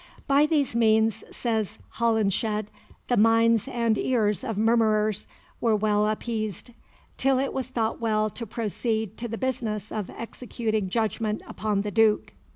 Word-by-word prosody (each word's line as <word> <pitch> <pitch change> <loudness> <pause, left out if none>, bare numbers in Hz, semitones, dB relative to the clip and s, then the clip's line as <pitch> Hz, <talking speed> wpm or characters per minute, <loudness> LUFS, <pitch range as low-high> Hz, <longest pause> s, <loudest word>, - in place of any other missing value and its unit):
By 285 +2 +4
these 290 -6 +1
means, 220 -1 +3
says 220 -5 -2 0.2
Holinshed, 215 -2 +1 0.4
the 245 - +2
minds 225 +1 +4
and 235 -4 0
ears 210 -7 +1
of 225 -5 -3
murmurers 215 -2 +2 0.3
were 225 -2 +2
well 210 0 +2
appeased, 215 0 -3 0.5
till 270 0 +2
it 270 +1 -1
was 265 -1 -2
thought 230 -3 -2
well 215 -2 +1
to 230 +2 -7
proceed 220 0 -2
to 240 - -4
the 225 0 -4
business 225 -5 -3
of 210 -4 -3
executing 225 -3 -3
judgment 215 0 -1
upon 210 -2 -1
the 210 - -3
Duke. 220 +1 +2
220 Hz, 145 wpm, -26 LUFS, 215-235 Hz, 0.5 s, By